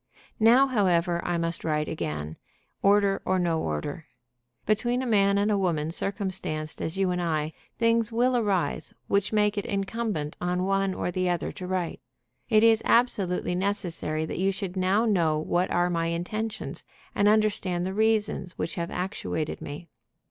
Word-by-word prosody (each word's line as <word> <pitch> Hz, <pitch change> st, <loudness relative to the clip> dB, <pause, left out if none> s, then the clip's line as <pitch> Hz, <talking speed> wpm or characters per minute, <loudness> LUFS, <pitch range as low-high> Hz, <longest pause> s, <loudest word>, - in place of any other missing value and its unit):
"Now, 235 Hz, +5 st, +6 dB
however, 180 Hz, -8 st, +1 dB
I 175 Hz, -1 st, -1 dB
must 165 Hz, 0 st, -2 dB
write 150 Hz, -1 st, 0 dB
again, 75 Hz, -, -4 dB, 0.5 s
order 200 Hz, 0 st, +3 dB
or 185 Hz, -, +1 dB
no 170 Hz, -3 st, +1 dB
order. 80 Hz, -, -4 dB, 0.6 s
Between 240 Hz, +4 st, +1 dB
a -, -, -2 dB
man 200 Hz, -4 st, +3 dB
and 205 Hz, +1 st, +2 dB
a 205 Hz, -, +2 dB
woman 160 Hz, -4 st, 0 dB
circumstanced 185 Hz, -5 st, -3 dB
as 160 Hz, +4 st, -3 dB
you 190 Hz, -2 st, +2 dB
and 180 Hz, 0 st, -1 dB
I, 155 Hz, -2 st, -1 dB, 0.2 s
things 230 Hz, -1 st, +2 dB
will 245 Hz, +2 st, +2 dB
arise 205 Hz, -6 st, 0 dB
which 200 Hz, 0 st, +1 dB
make 210 Hz, -1 st, +2 dB
it -, -, -5 dB
incumbent 200 Hz, -6 st, -2 dB
on 180 Hz, +1 st, 0 dB
one 195 Hz, -1 st, +1 dB
or -, -, -2 dB
the 185 Hz, 0 st, 0 dB
other 175 Hz, -1 st, -1 dB
to 180 Hz, -, -7 dB
write. 185 Hz, -2 st, -2 dB, 0.5 s
It 215 Hz, -2 st, +5 dB
is 225 Hz, -1 st, +5 dB
absolutely 195 Hz, -7 st, +2 dB
necessary 175 Hz, -5 st, -1 dB
that -, -, -5 dB
you 195 Hz, +1 st, +2 dB
should 190 Hz, -1 st, -5 dB
now 190 Hz, +4 st, +2 dB
know 170 Hz, -8 st, +2 dB
what 175 Hz, +4 st, 0 dB
are 175 Hz, 0 st, +1 dB
my 165 Hz, -1 st, 0 dB
intentions, 215 Hz, +6 st, -4 dB, 0.3 s
and 200 Hz, -, +2 dB
understand 205 Hz, -4 st, +2 dB
the 190 Hz, -, -3 dB
reasons 210 Hz, -4 st, +1 dB
which 165 Hz, -, -2 dB
have 170 Hz, 0 st, -3 dB
actuated 180 Hz, -4 st, -3 dB
me. 150 Hz, +4 st, -7 dB
185 Hz, 165 wpm, -27 LUFS, 170-210 Hz, 0.6 s, Now